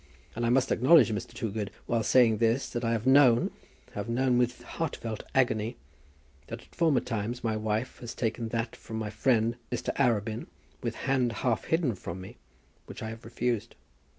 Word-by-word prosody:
And 120 +1 0
I - - +2
must 130 +2 +2
acknowledge, 135 +1 +6
Mr. 105 - -4
Toogood, 105 -2 -3 0.2
while 115 -1 +1
saying 115 -1 +4
this, 115 +4 +2
that 120 0 -4
I 115 - +1
have 115 0 -2
known, 130 -3 +5 0.4
have - - -5
known 125 +1 +2
with 125 0 0
heartfelt 115 -9 -4
agony, 120 -3 +2 0.7
that - - -7
at - - -23
former 155 -7 +3
times 115 +1 -3
my 110 -2 0
wife 110 +3 -2
has 120 -1 -7
taken 115 0 -2
that 115 0 -3
from 110 - -7
my 110 -1 -3
friend 115 +1 +2
Mr. 120 - -2
Arabin, 115 -4 +1 0.3
with - - -3
hand 130 -3 +2
half 115 -3 +1
hidden 160 -7 +1
from 90 -2 -7
me, 95 - -10 0.5
which - - -8
I 110 - -3
have 115 +1 -9
refused. 115 -1 -2
115 Hz, 180 wpm, -29 LUFS, 110-125 Hz, 0.7 s, acknowledge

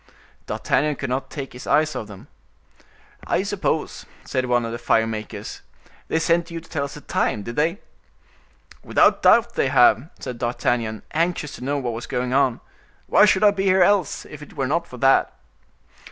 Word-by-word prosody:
D'Artagnan 150 +1 0
could 135 -2 -5
not 130 +2 -2
take 140 -3 -7
his 125 +2 -10
eyes 155 0 +2
off 110 - -5
them. 100 -3 -12 1.0
"I - - +1
suppose," - - -2 0.2
said 130 -1 -1
one 120 -1 +1
of 115 - -4
the 120 - -5
fire 115 -1 +2
makers, 110 -1 -6 0.5
"they - - 0
sent 170 +1 +1
you 170 -1 -5
to 165 - -17
tell 145 -4 -2
us 140 - -9
the 150 - -10
time—did 115 -2 -2
not - - +2
they?" 170 +6 0 1.0
"Without - - +3
doubt 235 0 +5
they - - +1
have," 130 0 +4
said 125 -2 -7
D'Artagnan, 120 -2 -1
anxious 165 -2 -1
to - - -10
know 140 +2 -1
what 125 -4 -3
was 115 +2 -6
going 125 0 -2
on; 130 -3 +2 0.4
"why - - +5
should 190 0 +3
I 205 - +7
be 195 -1 -2
here 190 -1 +5
else, 195 -4 +1
if 150 - -11
it 150 - -13
were 135 - 0
not 170 +6 -1
for 125 - -10
that?" 135 +2 +3
140 Hz, 190 wpm, -22 LUFS, 120-165 Hz, 1.0 s, I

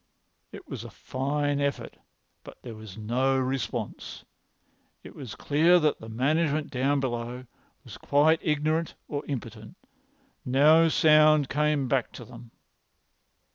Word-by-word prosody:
It - - -12
was - - -7
a - - -9
fine 145 +2 -2
effort, 140 -1 -3 0.5
but - - -13
there 120 - -8
was 110 -2 -11
no 125 +5 0
response. 130 0 -4 0.8
It - - -12
was 125 -7 -9
clear 165 +5 +3
that 155 -2 0
the 110 - -10
management 150 +5 0
down 140 +2 0
below 125 -1 -4 0.4
was - - -12
quite 155 +3 +3
ignorant 155 +1 -1
or 145 -1 -4
impotent. 115 -5 -7 0.7
No 155 +6 +4
sound 155 -2 +4
came 150 -2 0
back 130 -1 0
to - - -10
them. 120 -1 -13
140 Hz, 130 wpm, -26 LUFS, 125-150 Hz, 0.8 s, No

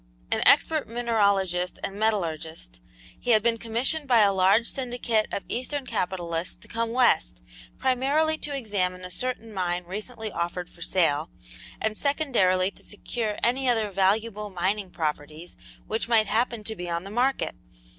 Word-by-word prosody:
An - - +1
expert 315 -3 +4
mineralogist 200 -6 +1
and 195 - -3
metallurgist, 160 - -2 0.4
he 245 - -5
had 215 -3 +5
been 230 -1 +2
commissioned 245 +7 0
by 240 -4 +5
a 200 -1 +5
large 195 +5 +4
syndicate 240 -4 0
of - - -3
eastern 260 +3 -3
capitalists 180 -6 -2
to - - -14
come 230 0 -2
west, 240 - +2 0.4
primarily 275 +5 +2
to 285 -1 -1
examine 185 -6 -1
a 180 - -7
certain 230 +1 -3
mine 180 -2 -1
recently 215 +4 -5
offered 175 +1 -3
for 170 - -18
sale, 160 -3 +2 0.5
and 220 -1 -1
secondarily 210 -11 +2
to - - -12
secure 215 0 -3
any 255 +2 +2
other 220 -4 +1
valuable 210 +2 +1
mining 190 +2 -1
properties 155 0 -4 0.3
which 220 +1 -2
might 225 -2 +4
happen 225 +1 0
to 220 +1 -4
be 175 -3 -6
on 170 0 -2
the 195 - -8
market. 255 +5 +1
215 Hz, 155 wpm, -26 LUFS, 180-240 Hz, 0.5 s, had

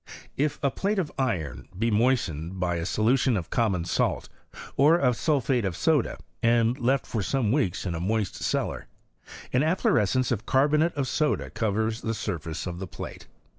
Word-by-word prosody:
If 145 +2 0
a 140 - +2
plate 200 +7 -1
of 175 -6 -1
iron 100 - -2
be 115 +3 +1
moistened 95 - 0
by 90 -1 0
a 85 +1 -3
solution 120 +3 +2
of 85 - -5
common 100 -8 +1
salt, 90 - 0 0.5
or 150 +5 +5
of 125 -7 +2
sulphate 135 -4 +1
of 95 -3 -2
soda, 150 +1 +1 0.2
and 115 0 +3
left 130 +2 +1
for 110 - -2
some 115 +1 0
weeks 120 - 0
in 90 - -2
a 80 - -3
moist 105 +3 -1
cellar, - - -2 0.7
an 125 - +3
affloreacence 130 - +2
of 115 -1 -2
carbonate 150 +5 +3
of 140 -2 -1
soda 150 +2 0
covers 110 +1 -1
the 115 0 -2
surface 85 -5 -4
of 90 -1 -5
the 95 - -5
plate. - - -8
115 Hz, 170 wpm, -26 LUFS, 95-135 Hz, 0.7 s, or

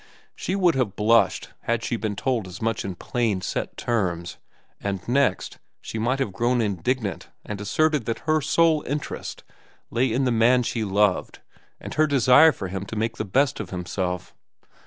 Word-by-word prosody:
She 185 - -2
would 180 -4 +3
have 120 -7 -1
blushed 115 +2 +3 0.2
had 115 -1 0
she 120 - -1
been 110 -2 -3
told 115 -2 -1
as 90 +1 -9
much 115 -1 -1
in 95 -2 -4
plain, 115 -2 -1
set - - -4
terms, 90 -7 -2 0.4
and 100 -2 -4
next, 140 +3 +1 0.2
she 110 - -6
might 120 +4 +1
have 135 -8 -2
grown 120 +3 +1
indignant 105 +1 -2 0.2
and 105 -1 -5
asserted 150 +5 +1
that 115 0 -3
her 155 -1 +2
sole 160 +1 +3
interest 145 +1 -4 0.5
lay 125 +1 +1
in 130 +4 +1
the 125 - +2
man 120 +2 +4
she 115 -1 -2
loved 100 -1 +1 0.4
and - - -7
her 155 0 +3
desire 140 +3 +6
for 100 - -6
him 95 +1 -4
to 115 - -6
make 115 +1 -2
the 110 - -2
best 135 +8 +1
of - - -5
himself. 90 0 -3
115 Hz, 180 wpm, -24 LUFS, 100-130 Hz, 0.5 s, desire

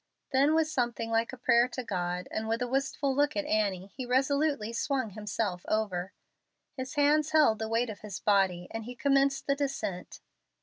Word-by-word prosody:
Then, 280 +4 +4
with 320 -1 +3
something 240 -5 -2
like 225 0 +1
a 255 - -9
prayer 240 -1 +4
to 255 0 -5
God 180 -4 -3
and 220 0 -3
with 225 +2 0
a - - -2
wistful 270 +1 0
look 290 +2 +1
at 300 - 0
Annie, 200 -6 0
he 260 - -4
resolutely 270 -2 +1
swung 260 -2 -1
himself 205 -2 -3
over. 190 -4 -1 0.6
His 260 +2 -6
hands 300 +1 +3
held 290 -9 +5
the 220 0 -3
weight 230 +1 0
of 205 - -10
his 210 -3 -7
body, 190 -4 +2
and 225 -1 -5
he 250 +1 -7
commenced 275 -1 +2
the 280 - +2
descent. 275 -10 -4
240 Hz, 185 wpm, -29 LUFS, 210-275 Hz, 0.6 s, held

